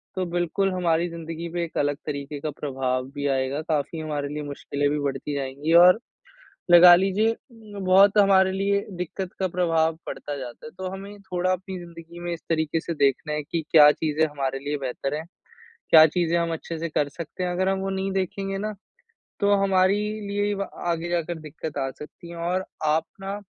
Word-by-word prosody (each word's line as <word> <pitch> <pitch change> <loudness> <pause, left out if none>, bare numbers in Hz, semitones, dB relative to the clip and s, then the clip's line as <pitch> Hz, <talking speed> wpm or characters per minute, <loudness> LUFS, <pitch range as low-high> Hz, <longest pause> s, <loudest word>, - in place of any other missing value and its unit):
तो 185 -1 -1
बिल्कुल 175 +3 0
हमारी 175 -1 +1
ज़िंदगी 165 0 -6
पे 175 -1 -1
एक 165 - -6
अलग 145 0 +1
तरीके 145 -1 -5
का 155 - -3
प्रभाव 130 -3 -2
भी 145 0 -2
आएगा, 135 +3 -1
काफ़ी 155 +1 -2
हमारे 150 -2 -3
लिए 150 0 -4
मुश्किलें 145 0 -2
भी 150 - 0
बढ़ती 140 +1 -3
जाएँगी 140 +4 -2
और, 180 +5 +7 0.7
लगा 175 0 +10
लीजिए 195 +5 +2
अ, - - -9 0.4
बहुत 195 +2 +5
हमारे 190 -2 +5
लिए 200 +1 +1 0.2
दिक्कत 180 +1 -5
का 190 -1 0
प्रभाव 165 -2 +1
पड़ता 145 -1 -5
जाता 125 -3 -8
है। - - -8
तो 190 0 -3
हमें 200 +2 -9
थोड़ा 180 -1 -1
अपनी 185 +1 -4
ज़िंदगी 170 0 -11
में 175 0 -3
इस 170 - -5
तरीके 160 0 0
से 170 - -4
देखना 140 +1 +1
है 150 0 -1
कि 160 +2 -3
क्या 150 -2 +8
चीज़ें 155 0 0
हमारे 135 -3 -3
लिए 145 +2 -3
बेहतर 135 +1 -3
है? 155 - -3 0.7
क्या 155 -1 +10
चीज़ें 170 +1 0
हम 170 -1 -1
अच्छे 165 0 -5
से 170 +1 -3
कर 150 -2 0
सकते 165 +4 -7
हैं? 180 - -1
अगर 185 +2 0
हम 195 0 +1
वो 195 - -3
नहीं 195 0 -2
देखेंगे 195 +1 -2
ना, 215 +2 -3 0.7
तो 205 0 +4
हमारी 190 0 +3 0.3
लिए 205 +1 0
व 200 0 -3 0.2
आगे 170 0 -1
जाकर 170 -1 -1
दिक्कत 155 -1 -7
आ 135 -1 -1
सकती 150 +3 -11
है 170 - -8
और 180 +3 -1 0.2
आप 155 +1 +2 0.2
ना 195 +1 -5
170 Hz, 195 wpm, -25 LUFS, 150-185 Hz, 0.7 s, लगा